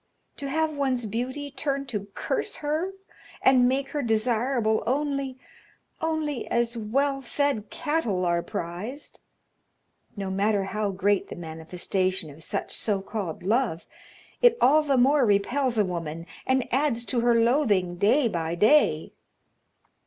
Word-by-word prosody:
To 280 - -4
have 315 +1 0
one's 260 -4 0
beauty 255 +7 -4
turn 275 -1 -2
to 210 -6 -4
curse - - -2
her 310 +5 -2 0.5
and 250 -2 +5
make 270 +1 -1
her 295 - -2
desirable 230 0 +1
only 275 0 -1 0.6
only 315 -4 -1
as 235 0 0
well 270 +5 0
fed 270 -4 -1
cattle 295 - -1
are 170 0 +2
prized. 190 - -6 1.0
No 195 -1 -3
matter 200 +1 +1
how 205 +2 -2
great 200 +1 +1
the - - -6
manifestation 175 +1 -3
of 150 +3 -14
such - - -3
so 205 -3 0
called 195 -5 -5
love, 215 -4 0 0.6
it 485 -1 +6
all 300 +4 +5
the 280 -3 +1
more 270 +3 +4
repels 235 +4 +1
a 210 - +4
woman 165 -2 -4 0.2
and 260 -1 +2
adds 260 -4 +1
to 245 - 0
her 240 0 +3
loathing 220 -8 +2
day 235 +8 +3
by 170 -5 -2
day. 275 - +3
235 Hz, 140 wpm, -26 LUFS, 195-275 Hz, 1.0 s, it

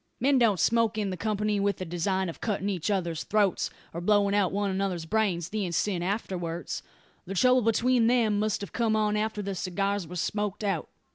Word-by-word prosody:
Men 270 +2 +3
don't 215 -6 +3
smoke 230 +3 +2
in 200 -3 -1
company 210 0 0
with 200 -1 +1
the 185 - -5
design 185 +3 -1
of 165 - -7
cutting 205 -2 -1
each 185 -1 -2
other's 175 -5 -1
throats, 205 -3 +1 0.2
or 170 - -4
blowing 200 +1 +3
out 200 -3 +2
one 200 0 0
another's 190 -3 -2
brains, 180 -3 0
the 215 -1 -2
instant 180 0 -1
afterwards. 175 -4 -3 0.5
The 195 - -4
trouble 255 +6 +5
between 230 +1 +3
them 230 -4 +3
must 215 -1 0
have 200 - -7
come 225 -3 +1
on 210 -1 +1
after 210 0 -1
the 200 0 -3
cigars 195 0 -1
were 180 - -8
smoked 205 +3 -2
out. 195 -6 -1
200 Hz, 195 wpm, -28 LUFS, 185-215 Hz, 0.5 s, trouble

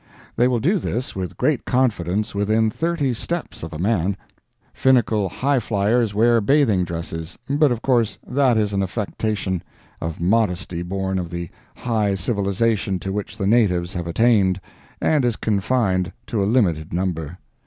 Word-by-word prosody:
They 120 +2 +4
will 125 -2 +1
do 185 - +2
this 125 -4 -3
with 95 -3 -5
great - - +1
confidence 105 -5 0
within 110 +2 +1
thirty 160 -2 0
steps 170 +8 -4
of 80 - -6
a 80 - -6
man. 95 0 0 0.6
Finical 115 -6 +2
highflyers 115 -4 +1
wear 115 +2 +4
bathing 115 -6 +3
dresses, 80 -1 -5
but 145 0 +3
of 120 -2 -2
course 120 -5 +2
that 130 -3 +2
is 105 -2 +1
an 100 - +1
affectation 100 -1 -2 0.4
of 80 -1 -4
modesty 90 -2 0
born 95 +1 -2
of 85 -2 -4
the 85 -1 -5 0.3
high 110 -5 0
civilization 100 +1 0
to 95 +2 -4
which 105 -1 -4
the 100 - -2
natives 95 -5 +2
have 85 -2 -4
attained, 100 -1 +3 0.4
and 150 -4 +2
is 120 -3 +1
confined 100 -3 0
to 110 -4 -1
a 100 - +1
limited 85 -10 +1
number. 85 -2 -2
105 Hz, 155 wpm, -22 LUFS, 90-120 Hz, 0.6 s, They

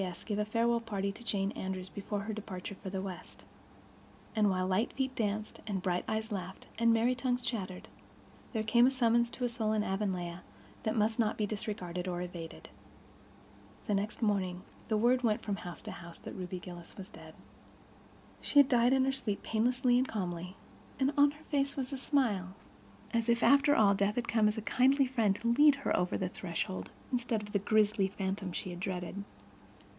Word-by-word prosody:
S. 180 -2 -4
gave 210 -2 -2
a 210 - +1
farewell 235 +2 +2
party 200 -3 -2
to 210 - -12
Jane 200 -3 0
Andrews 190 -2 -4
before 200 +1 -4
her 215 +2 -4
departure 200 -2 -6
for 195 0 -8
the 190 0 -3
West. 185 -2 -8 0.9
And, 210 -2 +4
while 185 -1 +1
light 190 +5 +1
feet 265 -1 -1
danced 215 -1 -2
and 195 -3 -2
bright 180 -1 0
eyes 220 +1 -2
laughed 190 -2 -5
and 230 0 +5
merry 230 +2 +3
tongues 250 0 -1
chattered, 195 -7 -4 0.6
there 220 -3 -1
came 235 +3 +5
a - - +3
summons 235 -2 +3
to 250 - -3
a - - 0
soul 220 -2 0
in 215 -1 +2
Avonlea 185 -3 -2 0.4
that 215 - -1
might 220 +1 +1
not 220 -2 +2
be 215 - +1
disregarded 190 -4 -4
or 175 -1 -2
evaded. 165 - -8 1.2
The 210 - 0
next 205 +4 -1
morning 185 -4 0 0.2
the 220 - +1
word 245 +3 +4
went 220 -3 +1
from 205 -2 -2
house 180 -5 -8
to - - -6
house 170 -1 -10
that - - -9
Ruby 185 0 -5
Gillis 175 -1 -10
was 195 +1 -9
dead. - - -12 1.1
She - - 0
had 285 -2 +9
died 245 0 +4
in 265 -1 +4
her 270 - +2
sleep, 245 -7 -2
painlessly 245 +2 +2
and 260 - +1
calmly, 180 -4 -4 0.4
and 270 +2 +2
on 285 0 +6
her 295 +2 -12
face 280 -2 0
was 265 0 -3
a - - -2
smile—as 200 - -2
if, 235 0 +3
after 280 +1 +6
all, 205 -2 +5
death 200 +1 +1
had 240 -1 -1
come 220 -2 +3
as 210 +2 0
a 220 - -3
kindly 270 +4 +4
friend 230 -6 +2
to 230 +3 -4
lead 290 +5 +6
her 275 - 0
over 180 0 +1
the 185 - -1
threshold, 170 - -4 0.2
instead 240 -3 0
of 205 - -9
the 200 - +2
grisly 210 -1 +3
phantom 190 -1 -3
she 180 - -4
had 175 - -7
dreaded. 185 +1 -4
210 Hz, 195 wpm, -32 LUFS, 190-235 Hz, 1.2 s, had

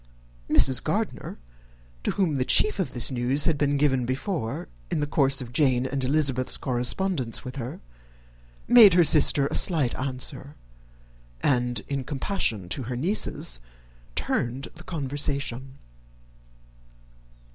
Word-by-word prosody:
Mrs. - - +5
Gardiner, - - -3 0.6
to - - -2
whom 170 -8 0
the 130 - +1
chief 215 +10 +3
of 190 - -2
this 120 +2 +1
news 130 +3 0
had 165 - +2
been 145 0 0
given 130 -4 +1
before, 130 - -4 0.2
in - - -2
the 145 - 0
course 135 -2 +2
of 120 0 -12
Jane 130 -3 +2
and 135 0 -3
Elizabeth's 135 -2 +1
correspondence 130 +2 -1
with 125 +2 -8
her, 125 -1 -7 0.9
made 225 -7 +7
her 175 - +6
sister 150 -2 +4
a - - -4
slight 155 -10 +3
answer, 130 +2 -3 0.9
and, 125 -4 0
in 140 -2 -3
compassion 130 - -2
to 135 - -2
her 125 - -3
nieces, 130 - -1 0.6
turned 125 +3 -2
the 175 - -12
conversation. 140 -4 -3
135 Hz, 130 wpm, -25 LUFS, 125-150 Hz, 0.9 s, made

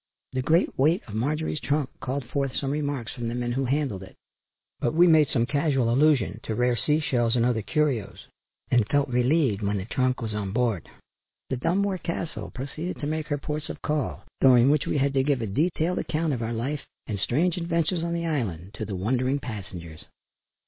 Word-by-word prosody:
The 130 - 0
great 160 +5 +2
weight 160 +7 +3
of 105 - -9
Marjorie's 150 +7 -1
trunk 145 -1 0
called 130 0 -3
forth 135 +1 -2
some 135 -1 -1
remarks 145 -5 -2
from 120 -3 -4
the 115 - -2
men 120 0 -1
who 135 +2 0
handled 135 -7 0
it, 95 - -12 0.6
but 120 - 0
we 175 +2 +7
made 160 -4 +6
some 120 -3 +1
casual 135 -3 +1
allusion 140 -5 +3
to 110 - -3
rare 125 +1 +2
sea 150 +5 +2
shells 120 -6 +1
and 120 -1 +3
other 120 -3 +1
curios 140 -6 -1 0.5
and 120 -4 +4
felt 145 -1 +2
relieved 125 -3 +2
when 100 0 0
the 95 - -4
trunk 130 +2 0
was 110 -2 -3
on 100 -2 -3
board. 115 -7 0 0.6
The 130 - 0
Dunmore 190 +7 +1
Castle 170 -1 -4
proceeded 155 +7 -5
to - - -3
make 155 +1 -2
her 145 - 0
ports 150 +2 -4
of - - -7
call, 150 -2 -1 0.2
during 130 0 +7
which 150 -1 +1
we - - +1
had 140 0 +2
to 135 - +3
give 140 -2 +1
a - - 0
detailed 160 - 0
account 155 -1 -1
of 120 - -3
our 115 0 -2
life 135 +6 -2 0.2
and 100 -2 -3
strange 160 - +1
adventures 170 0 0
on 170 0 -1
the 170 0 -2
island, 105 - -2
to 110 - -2
the 100 -2 -4
wondering 125 +8 +1
passengers. 95 - -7
135 Hz, 205 wpm, -26 LUFS, 115-150 Hz, 0.6 s, we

